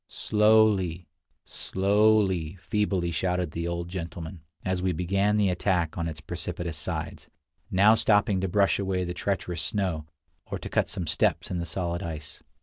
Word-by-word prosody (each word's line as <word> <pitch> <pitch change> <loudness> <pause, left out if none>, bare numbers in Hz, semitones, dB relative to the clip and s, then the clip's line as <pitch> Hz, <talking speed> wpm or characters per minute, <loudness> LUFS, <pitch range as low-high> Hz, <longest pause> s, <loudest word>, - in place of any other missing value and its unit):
"Slowly, 105 -5 +3 0.4
slowly," 100 -4 +2
feebly 95 -3 -1
shouted 90 +1 -1
the 85 +2 -3
old 85 0 -3
gentleman, 85 -1 -6 0.2
as 95 -1 0
we 90 0 +1
began 100 +5 +1
the 100 -2 +3
attack 90 -3 0
on 85 -1 -2
its 80 -2 -6
precipitous 85 0 -5
sides, 75 - -4 0.4
now 100 +4 +6
stopping 105 -3 +3
to 95 - 0
brush 100 +2 +2
away 95 -2 -1
the 90 0 -3
treacherous 90 -4 -2
snow, 85 -4 -1 0.4
or - - -4
to - - -7
cut - - +1
some 90 - -4
steps 80 - +1
in 90 - -1
the 85 - -4
solid 85 0 -2
ice. 75 -3 -7
90 Hz, 155 wpm, -27 LUFS, 85-100 Hz, 0.4 s, now